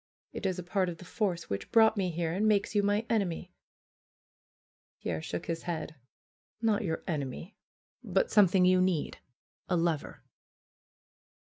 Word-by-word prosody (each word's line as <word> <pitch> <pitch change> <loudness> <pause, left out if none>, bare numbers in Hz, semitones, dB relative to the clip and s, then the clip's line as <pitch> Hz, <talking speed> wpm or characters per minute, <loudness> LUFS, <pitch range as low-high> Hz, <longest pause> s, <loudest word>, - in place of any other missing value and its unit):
It 200 - -2
is 185 -1 -1
a 180 - -4
part 185 +1 0
of 170 - -6
the 180 - -12
force 180 -3 -2
which 100 - -4
brought 220 -1 +6
me 190 -3 0
here, 165 -1 -2
and 205 +4 +1
makes 205 -1 +2
you 205 - +3
my 205 +2 +1
enemy." 185 -5 -1 1.5
Pierre 80 -2 -3
shook 85 - -5
his 165 -1 -3
head. 165 -3 -4 0.7
"Not 220 -2 +1
your 160 -4 -2
enemy; 155 - -4 0.5
but - - +1
some 205 -3 +7
thing 180 +1 +3
you 185 0 +5
need 185 -5 0 0.3
— - - -45
a 180 - +2
lover." 165 -3 -1
180 Hz, 160 wpm, -30 LUFS, 165-205 Hz, 1.5 s, some